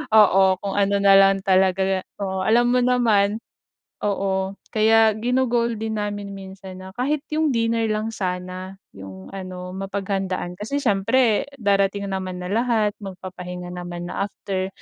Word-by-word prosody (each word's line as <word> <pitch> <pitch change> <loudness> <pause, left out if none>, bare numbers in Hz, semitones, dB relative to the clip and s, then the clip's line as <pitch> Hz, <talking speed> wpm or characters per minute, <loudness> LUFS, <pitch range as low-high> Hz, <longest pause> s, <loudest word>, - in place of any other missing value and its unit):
Oo, 190 -3 +5
kung 200 -1 -3
ano 200 0 +2
na 195 0 +7
lang 195 0 +5
talaga 190 0 +2 0.2
oo. 190 -1 -2
Alam 240 +2 +4
mo 250 - +3
naman 220 -4 +2 0.7
oo. 195 -1 0 0.2
Kaya 220 0 +5
gino-goal 240 -1 +1
din 220 -1 -2
namin 205 -1 -4
minsan 190 -1 -10
na 190 0 -9
kahit 280 +6 -1
'yong 310 0 +2
dinner 230 0 +1
lang 215 +1 -1
sana 185 0 -4 0.2
'yong 95 -1 -11
ano, 185 -1 -7
mapaghandaan. 195 -2 -3
Kasi 250 +7 -3
siyempre 220 +2 +2
darating 200 -2 +1
naman 185 -1 -3
na 180 - -5
lahat, 225 -3 +2
magpapahinga 180 -2 -7
naman 175 -1 -6
na 195 - -2
after, 190 -1 -4
195 Hz, 140 wpm, -23 LUFS, 185-220 Hz, 0.7 s, na